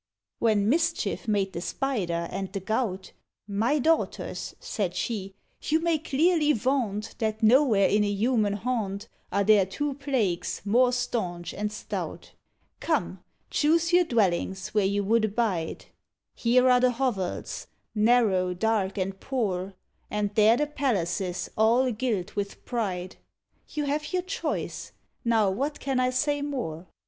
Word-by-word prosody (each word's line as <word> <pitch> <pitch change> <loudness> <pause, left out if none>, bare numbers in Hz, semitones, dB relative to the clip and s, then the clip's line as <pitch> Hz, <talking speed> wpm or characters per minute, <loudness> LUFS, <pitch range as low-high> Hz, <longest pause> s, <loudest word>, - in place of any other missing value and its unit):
When 215 -3 +2
Mischief 330 0 0
made 200 -3 +1
the 170 - -4
Spider 180 -9 -2
and 195 0 -4
the 200 - -3
Gout, 195 -1 -2 0.4
"My 220 +8 +1
daughters," 320 +4 -1
said 190 -5 -3
she, 195 -4 -3 0.3
"you 315 +1 +1
may 330 -1 +1
clearly 300 +2 +2
vaunt 225 -4 -1
That 220 0 -2
nowhere 225 -3 +5
in 210 0 +3
a 205 - 0
human 215 0 +1
haunt 205 -2 -2 0.2
Are 200 - +2
there 210 -1 +5
two 290 +8 -2
plagues 255 -14 -1
more 245 +5 +4
staunch 215 -9 -2
and 210 +1 -3
stout; 210 - -6 0.5
Come, - - -1 0.3
choose 330 +3 +2
your 355 0 +6
dwellings 190 - 0
where 210 -3 +2
you 200 +1 0
would 220 +2 +3
abide: 200 -6 -1 0.5
Here 250 +2 +3
are 250 -1 +6
the 250 0 +3
hovels 230 -8 -2 0.3
narrow, 210 -5 +3
dark, 205 -1 0
and 195 0 -2
poor, 195 -8 -2 0.3
And 210 -1 -1
there 220 +2 +5
the 295 - +1
palaces 190 - -1
all 235 +4 +3
gilt 215 -5 -2
with 200 -1 -4
pride, 190 -7 -3 0.5
You 300 - -2
have 295 +1 -2
your 365 -1 0
choice 370 - -4 0.3
now, 225 -5 +3
what 280 +9 -2
can 270 -2 -1
I 255 0 +3
say 290 +3 0
more? 235 - -4
220 Hz, 140 wpm, -27 LUFS, 195-260 Hz, 0.5 s, your